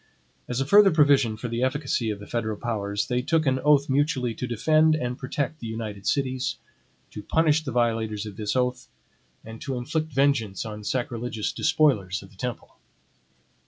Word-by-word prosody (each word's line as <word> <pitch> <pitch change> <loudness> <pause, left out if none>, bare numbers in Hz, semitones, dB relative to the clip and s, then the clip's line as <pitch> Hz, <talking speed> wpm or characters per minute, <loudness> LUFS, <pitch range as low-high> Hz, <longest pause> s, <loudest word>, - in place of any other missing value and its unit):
As 125 0 -2
a 135 - 0
further 200 +6 +7
provision 140 - +3
for 120 - -5
the 115 +1 -3
efficacy 130 -3 0
of 105 - -3
the 100 - -10
federal 110 -2 -3
powers, 100 -3 -2
they 125 0 0
took 155 +4 +1
an 130 -1 +2
oath 145 +1 +4
mutually 135 -3 +1
to 125 - -5
defend 155 +7 +3
and 125 -5 -2
protect 140 +3 -3
the 115 - -6
united 110 -3 -5
cities, 130 -2 0 0.6
to 105 - -7
punish 160 +6 +2
the 135 - -4
violators 115 -3 0
of 105 -2 -8
this 105 +2 -3
oath, 125 -1 -1 0.6
and 110 0 -10
to 135 -2 -3
inflict 155 +5 -2
vengeance 130 -8 +1
on 105 -1 -7
sacrilegious 120 -1 -2
despoilers 100 - +1
of 95 - -15
the - - -19
temple. 125 +3 -6
125 Hz, 175 wpm, -25 LUFS, 110-140 Hz, 0.6 s, further